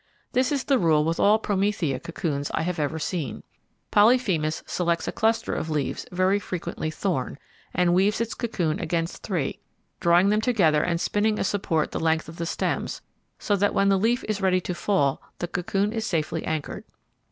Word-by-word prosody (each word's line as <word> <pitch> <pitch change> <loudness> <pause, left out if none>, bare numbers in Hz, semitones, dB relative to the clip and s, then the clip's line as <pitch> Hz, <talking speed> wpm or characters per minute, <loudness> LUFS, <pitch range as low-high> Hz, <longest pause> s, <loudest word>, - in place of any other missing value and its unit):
This 255 +2 +2
is 280 -2 0
the 275 -3 +2
rule 155 -3 +3
with 165 +1 -1
all 210 +2 +5
Promethea 195 -10 0
cocoons 145 -2 -3
I - - 0
ever 180 +2 -1
have 160 0 -5
seen. 155 - -3 0.5
Polyphemus 205 -9 +3
selects 170 -2 -1
a - - 0
cluster 225 +1 +1
of 160 - -3
leaves 150 -3 -2
very 185 +2 +2
frequently 180 -4 -4
thorn, 155 -6 -2 0.3
and 175 0 +2
weaves 195 +4 +3
its 230 0 -1
cocoon 175 -10 -2
against 165 0 -2
three, 165 -9 -2 0.4
drawing 175 +3 +4
them 210 +1 +2
together 185 -11 +3
and 170 +1 0
spinning 210 +4 +1
a - - 0
support 190 -6 0
the - - -3
length 160 -1 +1
of 165 +1 -10
the 170 - -3
stems, - - -2 0.3
so 205 - 0
that 205 +1 +1
when 195 0 +3
the 195 -1 +3
leaf 235 +4 +1
is 210 -2 -2
ready 185 -1 +3
to 180 - -3
fall 170 -7 +1 0.2
the 175 - -3
cocoon 195 +4 -1
is 225 -1 -2
safely 165 -7 -1
anchored. 155 -2 -3
180 Hz, 185 wpm, -25 LUFS, 160-205 Hz, 0.5 s, all